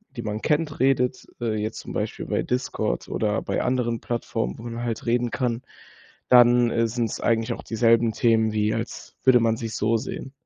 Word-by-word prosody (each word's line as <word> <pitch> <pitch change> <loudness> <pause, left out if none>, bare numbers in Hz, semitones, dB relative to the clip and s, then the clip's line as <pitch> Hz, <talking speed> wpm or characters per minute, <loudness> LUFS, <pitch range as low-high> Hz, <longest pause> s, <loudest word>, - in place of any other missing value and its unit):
die 120 - -4
man 105 0 -3
kennt, 150 -1 0
redet, 130 -2 +2
äh, 115 -3 -1
jetzt 110 +1 -3
zum - - -8
Beispiel - - -3
bei - - -1
Discord 125 - -2
oder 105 -1 -1
bei - - -2
anderen 120 -2 0
Plattformen, 70 - -3
wo - - -9
man 120 0 -5
halt 115 -2 -3
reden 120 0 +1
kann, 120 -2 -1 0.7
dann, 120 -1 +6
äh, 115 - +2
sind 115 0 -1
es - - -5
eigentlich 115 +1 +1
auch - - -9
dieselben 115 0 +3
Themen 110 -1 +2
wie 105 0 +1
als - - -6
würde 130 -2 +6
man 115 -1 +2
sich 115 -1 -5
so 110 +2 +1
sehen. 130 +4 -6
115 Hz, 195 wpm, -24 LUFS, 110-125 Hz, 0.7 s, dann